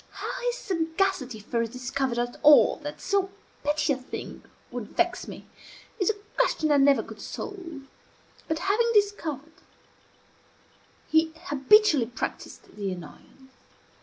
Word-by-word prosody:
How - - -5
his 485 - +1
sagacity 330 - -1
first 230 +2 -2
discovered 255 0 -2
at 240 0 -2
all 295 0 +7
that 295 -1 -7
so 390 -1 0 0.3
petty 295 0 +1
a - - -3
thing 255 - -8 0.3
would 240 -3 -7
vex 355 +1 +1
me, - - -9 0.5
is 380 - +2
a 440 - +1 0.2
question 315 -11 +2
I 290 - +5
never 275 0 +5
could - - -11
solve; 335 -9 -7 0.6
but 320 - 0
having 425 +7 +2
discovered, 320 -8 0 1.5
he 320 0 +3 0.2
habitually 290 - +5
practised 240 - -5
the 200 -2 -3
annoyance. 185 - -11
295 Hz, 130 wpm, -27 LUFS, 255-375 Hz, 1.5 s, all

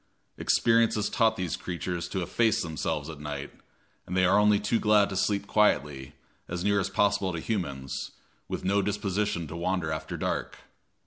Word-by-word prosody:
Experience 115 -1 +3
has 105 -1 -1
taught 110 -2 +3
these 90 -5 -2
creatures 90 -1 -4
to 95 - -2
efface 110 +5 +1
themselves 75 -2 -3
at 80 -3 -8
night, 75 -1 -5 0.6
and 90 - -2
they 90 - +4
are 95 +3 +5
only 105 0 +4
too 110 +2 0
glad 105 -1 +4
to 95 - -5
sleep 100 +1 0
quietly, 75 -11 +1 0.3
as 85 0 -4
near 100 0 +3
as 95 -1 -1
possible 100 -1 +1
to 85 - -4
humans, 70 -10 -3 0.4
with - - -5
no 100 +2 +3
disposition 105 -2 -1
to 80 +2 -8
wander 85 -2 -1
after 80 - -4
dark. - - -3
95 Hz, 175 wpm, -28 LUFS, 85-105 Hz, 0.6 s, are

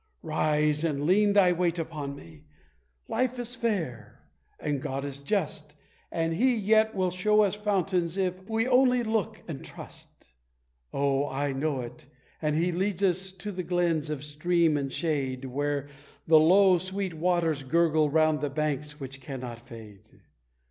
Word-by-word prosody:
Rise 150 -1 +1
and 145 -4 -1
lean 200 +4 +4
thy 195 -3 +5
weight 175 -1 0
upon 150 -4 -4
me. 155 +1 -14 0.6
Life 255 +1 -1
is 245 0 -5
fair, 205 - -3 0.4
and 145 -3 -2
God 135 +1 -3
is 140 -1 -6
just, 150 -2 -2 0.4
And 165 0 -1
He 245 +8 +3
yet 220 +1 +3
will 185 -2 +1
show 210 +4 +3
us 200 - +1
fountains, 195 -4 0
if 185 0 -2
we 225 +2 +1
only 250 -1 +4
look 220 -1 -2
and 155 -5 -6
trust! 70 - -13 0.6
Oh, 140 0 +1
I 140 +2 -1
know 135 -1 -1
it, 120 +1 -10 0.3
and 150 -1 0
He 170 +3 +1
leads 190 +2 -1
us 190 0 +2
to 190 +3 -6
the 185 -1 -4
glens 170 -3 0
of 150 -2 -4
stream 160 +2 +1
and 140 -2 -2
shade, 135 -5 -2
Where 145 +2 -2 0.4
the 160 -1 +7
low, 185 +3 +5
sweet 190 0 -3
waters 165 -2 0
gurgle 155 +2 +2
round 155 0 +2
the 145 - -1
banks 150 0 -2
which 135 0 -8
cannot 125 -3 -7
fade!" 115 -5 -14
165 Hz, 155 wpm, -28 LUFS, 145-190 Hz, 0.6 s, the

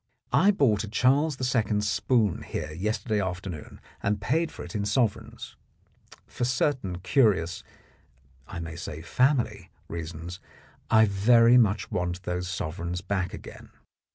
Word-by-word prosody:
I 170 +10 +5
bought 125 - +3
a - - -5
Charles 135 +6 +2 0.2
II. 110 -2 +1
spoon 105 -1 +1
here 75 - -5
yester 105 +10 -3
day 105 -1 +2
afternoon 90 -4 -5 0.2
and 100 +1 0
paid 160 +11 0
for - - -8
it - - -10
in 105 -2 -1
sovereigns. 105 +1 -1 0.7
For - - -5
certain 120 -7 0
curious, 90 - +2 0.8
I - - -6
may 85 0 -7
say 80 -2 -7
family, 115 - +1 0.2
reasons, 85 +2 -6 0.5
I 110 -1 +6
very 115 +4 +5
much 110 -2 +1
want 90 +1 -2
those 90 0 -3
sovereigns 90 0 -4
back 95 -2 -2
again. - - -10
100 Hz, 135 wpm, -27 LUFS, 90-120 Hz, 0.8 s, I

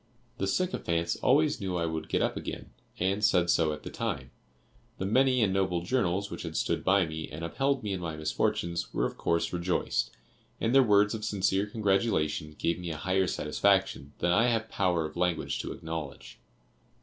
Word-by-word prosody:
The 95 - 0
sycophants 85 - 0
always 145 0 +3
knew 95 -2 -2
I 85 - 0
would 80 -1 -4
get - - +1
up - - 0
again, - - -6 0.3
"and 95 +3 0
said 90 -5 +4
so 80 -1 +2
at 75 - -6
the - - -7
time;" - - -3 0.7
the 95 - -3
many 125 +3 +3
and 95 -3 +2
noble 95 -3 0
journals 100 -3 0
which - - -5
had - - -5
stood - - 0
by 95 -1 +4
me 80 0 -6
and 80 +2 -6
upheld 135 +9 0
me 105 -2 -2
in 95 - -3
my 85 -3 -4
misfortunes, 85 +2 -1
were - - +2
of - - -3
course 85 +1 0
rejoiced, 90 +1 0 0.5
and 115 - 0
their 135 - +8
words 105 -3 +4
of 110 -1 -5
sincere 100 0 +1
congratulation 95 -8 0
gave 85 +1 0
me 90 -1 -5
a 80 - -4
higher 95 +3 +1
satisfaction 90 -4 +1
than 85 - +1
I 115 +7 +4
have 115 -2 0
power 90 -4 +1
of 75 - -7
language 90 -1 0
to - - -4
acknowledge. 80 -4 -7
95 Hz, 190 wpm, -29 LUFS, 85-105 Hz, 0.7 s, their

